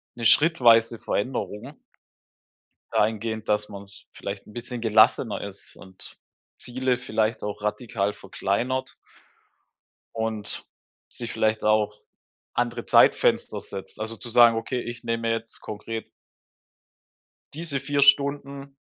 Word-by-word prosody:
'ne 115 Hz, -, -5 dB
schrittweise 120 Hz, -6 st, +5 dB
Veränderung 125 Hz, +3 st, -3 dB, 1.1 s
dahingehend, 110 Hz, +1 st, 0 dB
dass 105 Hz, 0 st, +1 dB
man's 100 Hz, -1 st, -12 dB
vielleicht 100 Hz, 0 st, -7 dB
'n -, -, -14 dB
bisschen 120 Hz, +1 st, -6 dB
gelassener 110 Hz, -1 st, +3 dB
ist 100 Hz, -1 st, -10 dB
und 95 Hz, -1 st, -12 dB, 0.4 s
Ziele 125 Hz, 0 st, -1 dB
vielleicht 110 Hz, -2 st, -1 dB
auch 105 Hz, 0 st, -5 dB
radikal 105 Hz, -2 st, -1 dB
verkleinert. 120 Hz, +8 st, -2 dB, 1.2 s
Und 110 Hz, -2 st, -4 dB, 0.4 s
sich 120 Hz, -1 st, -6 dB
vielleicht 110 Hz, 0 st, 0 dB
auch 105 Hz, -1 st, +2 dB, 0.5 s
andere 120 Hz, -1 st, -1 dB
Zeitfenster -, -, +4 dB
setzt, 95 Hz, -1 st, -8 dB
also 110 Hz, +1 st, -4 dB
zu 120 Hz, -, -8 dB
sagen: 120 Hz, -1 st, +6 dB
„Okay, 125 Hz, +2 st, -2 dB
ich 120 Hz, 0 st, -7 dB
nehme 115 Hz, 0 st, -1 dB
jetzt 115 Hz, 0 st, -4 dB
konkret“ 110 Hz, +1 st, -6 dB, 1.5 s
Diese 150 Hz, -3 st, -3 dB
4 145 Hz, 0 st, 0 dB
Stunden 140 Hz, -1 st, +2 dB
115 Hz, 110 wpm, -25 LUFS, 105-125 Hz, 1.5 s, sagen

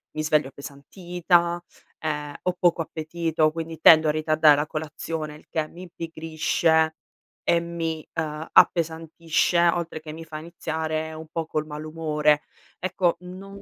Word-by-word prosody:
mi 155 Hz, -, -1 dB
sveglio 150 Hz, -2 st, +2 dB
appesantita, 170 Hz, +5 st, -1 dB, 0.4 s
ehm, 150 Hz, -2 st, -3 dB
ho 180 Hz, -, +1 dB
poco 175 Hz, -1 st, +3 dB
appetito, 160 Hz, 0 st, 0 dB
quindi 165 Hz, 0 st, -6 dB
tendo 160 Hz, -1 st, +8 dB
a -, -, +4 dB
ritardare 155 Hz, -1 st, +4 dB
la 150 Hz, +1 st, -1 dB
colazione, 155 Hz, 0 st, -5 dB
il 150 Hz, -, -17 dB
che 155 Hz, -1 st, -1 dB
mi 175 Hz, -, -12 dB
impigrisce 160 Hz, -1 st, 0 dB, 0.5 s
e 170 Hz, -, +4 dB
mi, 165 Hz, -2 st, -4 dB
ehm, 155 Hz, 0 st, -3 dB
appesantisce, 165 Hz, +1 st, +3 dB
oltre 170 Hz, -2 st, -3 dB
che 155 Hz, -, -8 dB
mi 165 Hz, +1 st, -8 dB
fa 155 Hz, -, -7 dB
iniziare 160 Hz, -1 st, -3 dB
un 160 Hz, 0 st, -9 dB
po' 165 Hz, -1 st, -2 dB
col 155 Hz, -1 st, -2 dB
malumore. 150 Hz, -1 st, 0 dB, 0.4 s
Ecco, 180 Hz, -1 st, 0 dB
non 195 Hz, +2 st, -10 dB
160 Hz, 140 wpm, -25 LUFS, 155-170 Hz, 0.5 s, tendo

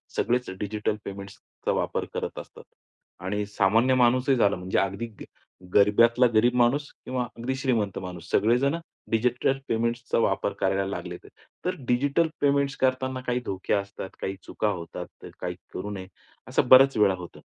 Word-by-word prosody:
सगळेच 125 Hz, -2 st, 0 dB
डिजिटल 105 Hz, +1 st, -1 dB
पेमेंट्सचा 100 Hz, 0 st, -6 dB
वापर -, -, -1 dB
करत -, -, -4 dB
असतात. -, -, -12 dB, 0.6 s
आणि 105 Hz, +2 st, -1 dB
सामान्य 110 Hz, +5 st, +3 dB
माणूसही 130 Hz, +2 st, +3 dB
झाला. 105 Hz, -4 st, +3 dB
म्हणजे 90 Hz, +1 st, -2 dB
अगदी 95 Hz, +4 st, -1 dB, 0.2 s
ग -, -, -5 dB, 0.5 s
गरिबातला 115 Hz, +5 st, +5 dB
गरीब 120 Hz, +3 st, +4 dB
माणूस 130 Hz, +4 st, +2 dB
किंवा 130 Hz, -1 st, -1 dB
अगदी 130 Hz, +3 st, -2 dB
श्रीमंत 120 Hz, -7 st, 0 dB
माणूस. 90 Hz, -3 st, -8 dB
सगळेजण 125 Hz, +7 st, +3 dB, 0.4 s
डिजिटल 125 Hz, +3 st, +1 dB
पेमेंट्सचा 115 Hz, +1 st, -1 dB
वापर 100 Hz, -, +1 dB
करायला 95 Hz, 0 st, +1 dB
लागलेत. 100 Hz, -, -6 dB, 0.4 s
तर -, -, 0 dB
डिजिटल 140 Hz, +6 st, +2 dB
पेमेंट्स 140 Hz, -1 st, +2 dB
करतांना 130 Hz, 0 st, 0 dB
काही 125 Hz, 0 st, +1 dB
धोके 95 Hz, -, -2 dB
असतात, 100 Hz, -1 st, -3 dB
काही 95 Hz, 0 st, -2 dB
चुका 105 Hz, -, -2 dB
होतात. 85 Hz, -4 st, -5 dB, 0.2 s
तर -, -, -8 dB
काही -, -, -4 dB, 0.2 s
करू 100 Hz, +3 st, -4 dB
नये, 95 Hz, -2 st, -6 dB, 0.4 s
असं -, -, +1 dB
बऱ्याच 135 Hz, 0 st, +8 dB
वेळा 105 Hz, -2 st, +5 dB
होतं. 90 Hz, -1 st, -10 dB
115 Hz, 150 wpm, -26 LUFS, 100-130 Hz, 0.6 s, बऱ्याच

